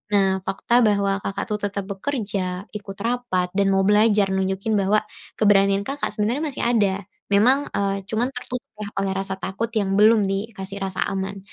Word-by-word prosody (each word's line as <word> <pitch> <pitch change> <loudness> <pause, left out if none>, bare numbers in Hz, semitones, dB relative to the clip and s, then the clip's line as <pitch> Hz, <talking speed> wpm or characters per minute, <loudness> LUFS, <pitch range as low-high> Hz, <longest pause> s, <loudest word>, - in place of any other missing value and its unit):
Nah, 190 -1 +3
fakta 235 +5 +2
bahwa 200 -3 +2
Kakak 195 - -3
tuh 210 - 0
tetap 200 0 -4
bekerja, 195 -5 -3
ikut 200 -2 -8
rapat, 235 -7 0
dan 200 +1 +1
mau 195 - +3
belajar 210 0 +4
nunjukin 190 +3 0
bahwa 205 +2 +2 0.3
keberanian 200 -1 +4
Kakak 285 +1 -2
sebenarnya 230 +8 0
masih - - -3
ada, 210 -5 +2 0.4
memang, 250 +8 +4
eee, 195 -1 -1
cuma 225 +3 +1
tertutup 250 0 -5 0.4
oleh 195 -1 0
rasa 195 0 -2
takut 195 +5 -3
yang 195 -2 0
belum 215 +1 +5
dikasih 195 -1 -4
rasa 190 -1 -1
aman. 195 +1 -3
200 Hz, 160 wpm, -23 LUFS, 195-220 Hz, 0.4 s, belum